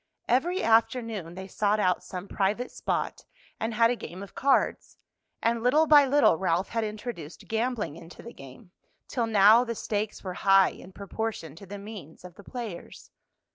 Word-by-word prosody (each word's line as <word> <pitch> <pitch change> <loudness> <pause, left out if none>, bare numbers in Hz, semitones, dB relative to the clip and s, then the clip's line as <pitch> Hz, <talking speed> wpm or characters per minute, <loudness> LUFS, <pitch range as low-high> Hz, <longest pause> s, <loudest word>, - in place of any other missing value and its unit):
Every 340 +10 +1
afternoon 225 -6 +1
they 190 0 -7
sought 210 +2 0
out 185 -3 +1
some 185 +1 -7
private 210 +6 -1
spot - - -3 0.4
and 225 0 -2
had 230 +1 +4
a - - 0
game 185 -3 -8
of 200 - -12
cards, 275 0 +1 0.5
and 230 0 +1
little 280 +7 +4
by 295 -2 +7
little 285 - +4
Ralph 180 0 0
had 230 -1 -1
introduced 210 -7 -7
gambling 225 - -2
into 165 +1 -13
the 235 - -10
game, 135 +7 -14 0.4
till 235 -3 -1
now 215 +2 +6
the 235 -2 -4
stakes 210 0 -3
were 185 -2 -4
high 195 -1 +6
in 185 - -13
proportion 200 -5 -5
to 195 +3 -12
the 205 +2 -7
means 200 -6 -10
of 180 - -10
the 205 - -15
players. 225 -6 -8
215 Hz, 175 wpm, -27 LUFS, 185-235 Hz, 0.5 s, by